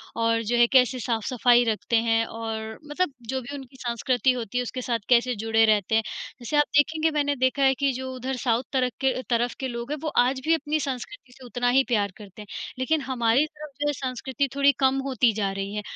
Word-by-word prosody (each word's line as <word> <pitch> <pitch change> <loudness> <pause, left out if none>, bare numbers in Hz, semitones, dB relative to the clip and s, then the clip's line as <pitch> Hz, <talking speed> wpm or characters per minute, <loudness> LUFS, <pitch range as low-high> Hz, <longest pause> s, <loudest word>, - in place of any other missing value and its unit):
और 230 0 +1
जो 240 +3 0
है 240 - +7
कैसे 250 -1 +4
साफ-सफाई 240 +1 +2
रखते 225 +1 -1
हैं, 225 0 +3
और 220 -1 -5
मतलब 300 0 -1 0.2
जो 265 0 -1
भी 245 +4 -8
उनकी 265 -1 -11
संस्कृति 245 +2 +1
होती 245 -1 -4
है, - - +2
उसके 255 +1 -5
साथ 235 -2 -1
कैसे 245 0 +4
जुड़े 225 +1 +2
रहते 215 0 +2
हैं। 225 - +3 0.4
जैसे 250 +5 -2
आप 295 - +6
देखेंगे, 315 +2 +3
मैंने 290 -1 0
देखा 260 +2 +1
है 265 0 +5
कि 275 0 +1
जो 260 +1 -5
उधर 255 +1 -3
साउथ 240 0 +1
तरक 255 -1 +1
के 265 -1 +2 0.2
तरफ 240 0 +1
के 265 - -2
लोग 240 +2 -5
हैं, 300 - -1
वो 310 - -1 0.2
आज 260 +1 -1
भी 325 - +4
अपनी 305 0 -2
संस्कृति 265 +1 -6
से 260 - -13
उतना 245 0 -1
ही - - +4
प्यार 205 -5 +1
करते 210 0 -12
हैं, 205 - -11 0.3
लेकिन 310 +4 +1
हमारी 240 +3 +2
तरफ 305 -1 -11
जो 295 - +1
है 290 - +1
संस्कृति 265 +1 -2
थोड़ी 280 0 +5
कम 265 0 +3
होती 250 -3 +3
जा 200 -2 -1
रही 195 +1 -4
है। 210 - -2
250 Hz, 225 wpm, -25 LUFS, 230-270 Hz, 0.4 s, है